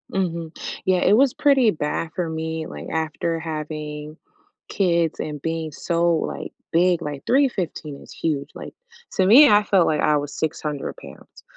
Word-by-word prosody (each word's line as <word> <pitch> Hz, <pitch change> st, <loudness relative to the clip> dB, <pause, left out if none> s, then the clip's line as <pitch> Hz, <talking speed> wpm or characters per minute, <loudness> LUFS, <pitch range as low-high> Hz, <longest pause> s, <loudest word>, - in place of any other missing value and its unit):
Mhm. 170 Hz, -4 st, -2 dB, 0.3 s
Yeah, 185 Hz, -2 st, +3 dB
it 195 Hz, -, +3 dB
was 260 Hz, +2 st, +4 dB
pretty 270 Hz, -6 st, +4 dB
bad 155 Hz, 0 st, -3 dB
for 175 Hz, -3 st, -2 dB
me, 160 Hz, 0 st, -4 dB
like, -, -, -8 dB
after 160 Hz, +1 st, -2 dB
having 155 Hz, -1 st, -6 dB, 0.5 s
kids 170 Hz, -4 st, +1 dB
and 150 Hz, -2 st, -5 dB
being 165 Hz, 0 st, -3 dB
so, 170 Hz, +3 st, +1 dB
like, 160 Hz, -, -4 dB, 0.2 s
big, 175 Hz, 0 st, +3 dB
like, 145 Hz, -3 st, -6 dB
315 190 Hz, -, 0 dB
is -, -, -14 dB
huge. 145 Hz, -3 st, -2 dB
Like, -, -, -9 dB, 0.4 s
to 190 Hz, -, +2 dB
me, 265 Hz, +9 st, +8 dB
I 210 Hz, 0 st, +5 dB
felt 195 Hz, -4 st, +3 dB
like 155 Hz, -, +1 dB
I 150 Hz, -1 st, +3 dB
was 145 Hz, 0 st, -4 dB
600 150 Hz, -2 st, -3 dB
pounds, -, -, -14 dB
165 Hz, 160 wpm, -22 LUFS, 155-185 Hz, 0.5 s, me